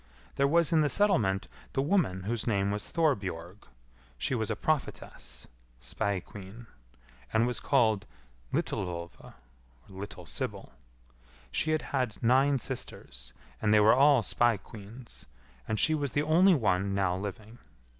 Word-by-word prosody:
There 140 Hz, -, +2 dB
was 170 Hz, +2 st, +3 dB
in 160 Hz, -, +5 dB
the 150 Hz, -, +2 dB
settlement 115 Hz, -, +2 dB, 0.3 s
the -, -, +1 dB
woman 145 Hz, -, +1 dB
whose 115 Hz, +3 st, -2 dB
name 100 Hz, -3 st, +1 dB
was 105 Hz, 0 st, -3 dB
Thorbjorg. 100 Hz, -, -1 dB, 0.5 s
She 95 Hz, -, -1 dB
was 110 Hz, -3 st, -1 dB
a -, -, 0 dB
prophetess 135 Hz, -, -3 dB, 0.3 s
(spae 95 Hz, -, -2 dB
queen), 100 Hz, +5 st, -11 dB, 0.7 s
and 115 Hz, +1 st, +3 dB
was 120 Hz, -2 st, 0 dB
called 110 Hz, -6 st, +2 dB, 0.4 s
Litilvolva 85 Hz, -2 st, -4 dB, 0.5 s
(little 95 Hz, -2 st, -8 dB
sybil). -, -, -5 dB, 0.8 s
She 155 Hz, -, 0 dB
had 155 Hz, 0 st, +1 dB
had 125 Hz, -6 st, 0 dB
nine 135 Hz, +4 st, +4 dB
sisters, -, -, -6 dB, 0.3 s
and 105 Hz, -, +2 dB
they 105 Hz, -, +6 dB
were 105 Hz, +1 st, +6 dB
all 140 Hz, -2 st, +5 dB
spae 120 Hz, +2 st, +2 dB
queens, 110 Hz, +4 st, -12 dB, 0.4 s
and 110 Hz, -, -1 dB
she 160 Hz, -, +4 dB
was 145 Hz, -4 st, -1 dB
the 145 Hz, -, +1 dB
only 175 Hz, +5 st, +5 dB
one 100 Hz, -, +1 dB
now 95 Hz, -2 st, +1 dB
living. 105 Hz, +4 st, -7 dB
110 Hz, 140 wpm, -29 LUFS, 95-140 Hz, 0.8 s, they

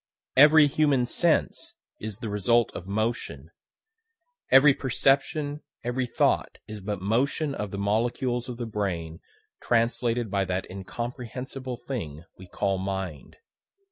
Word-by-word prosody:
Every 150 Hz, +3 st, +8 dB
human 145 Hz, -3 st, +2 dB
sense 165 Hz, +6 st, 0 dB, 0.2 s
is 105 Hz, -2 st, -6 dB
the 110 Hz, -, -5 dB
result 105 Hz, +3 st, +2 dB
of 90 Hz, -, -7 dB
motion; 110 Hz, +4 st, -3 dB, 1.0 s
every 140 Hz, +1 st, +7 dB
perception, 145 Hz, +3 st, 0 dB, 0.2 s
every 125 Hz, +1 st, -1 dB
thought -, -, +1 dB
is 105 Hz, -1 st, -7 dB
but 100 Hz, -1 st, -4 dB
motion 140 Hz, +7 st, 0 dB
of 105 Hz, -6 st, -4 dB
the 100 Hz, -, -6 dB
molecules 120 Hz, +5 st, 0 dB
of 120 Hz, -, -6 dB
the 120 Hz, -, -4 dB
brain 90 Hz, -7 st, -3 dB, 0.4 s
translated 120 Hz, -1 st, +1 dB
by 100 Hz, -1 st, +1 dB
that 95 Hz, 0 st, -2 dB
incomprehensible 125 Hz, +5 st, -6 dB
thing 95 Hz, -, -6 dB
we 95 Hz, -, -13 dB
call 95 Hz, +1 st, -1 dB
mind. 95 Hz, -5 st, -5 dB
115 Hz, 125 wpm, -26 LUFS, 100-130 Hz, 1.0 s, Every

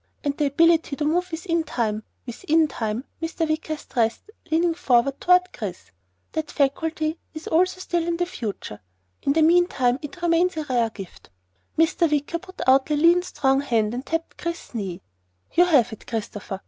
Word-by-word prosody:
And 285 Hz, -1 st, -1 dB
the 295 Hz, -1 st, +1 dB
ability 325 Hz, +1 st, +3 dB
to 295 Hz, -, -2 dB
move 355 Hz, +4 st, +1 dB
within 335 Hz, 0 st, -1 dB
Time 220 Hz, -7 st, -2 dB, 0.2 s
within 315 Hz, +6 st, +1 dB
Time," 225 Hz, -3 st, -3 dB, 0.2 s
Mr. 325 Hz, 0 st, -1 dB
Wicker 310 Hz, 0 st, -2 dB
stressed, 235 Hz, -, -2 dB, 0.2 s
leaning 330 Hz, +1 st, +2 dB
forward 275 Hz, -5 st, +2 dB
toward 360 Hz, 0 st, +4 dB
Chris, 180 Hz, -, -7 dB, 0.4 s
"that 315 Hz, -1 st, -3 dB
faculty 310 Hz, +3 st, 0 dB, 0.2 s
is 315 Hz, -, -7 dB
also 365 Hz, +3 st, +2 dB
still 345 Hz, -2 st, -1 dB
in 340 Hz, 0 st, 0 dB
the 350 Hz, -, +1 dB
future. 210 Hz, -, -6 dB, 0.4 s
In 280 Hz, -, +1 dB
the 320 Hz, +1 st, +3 dB
meantime 310 Hz, -7 st, +3 dB
it 310 Hz, +4 st, -8 dB
remains 340 Hz, 0 st, +2 dB
a 310 Hz, -, -1 dB
rare 245 Hz, -5 st, +1 dB
gift." 195 Hz, -4 st, -11 dB, 0.5 s
Mr. 325 Hz, +1 st, +3 dB
Wicker 295 Hz, +3 st, 0 dB
put 370 Hz, +1 st, -11 dB
out 265 Hz, +2 st, +4 dB
a 300 Hz, -, +2 dB
lean 335 Hz, +4 st, +5 dB
strong 275 Hz, -6 st, +1 dB
hand 225 Hz, -5 st, 0 dB
and 250 Hz, +2 st, -4 dB
tapped 325 Hz, +2 st, -4 dB
Chris's 340 Hz, -4 st, -5 dB
knee. 195 Hz, -6 st, -4 dB, 0.5 s
"You 355 Hz, -, +6 dB
have 260 Hz, -9 st, +3 dB
it, 220 Hz, -, -12 dB
Christopher. 205 Hz, -3 st, -5 dB
310 Hz, 175 wpm, -24 LUFS, 250-335 Hz, 0.5 s, You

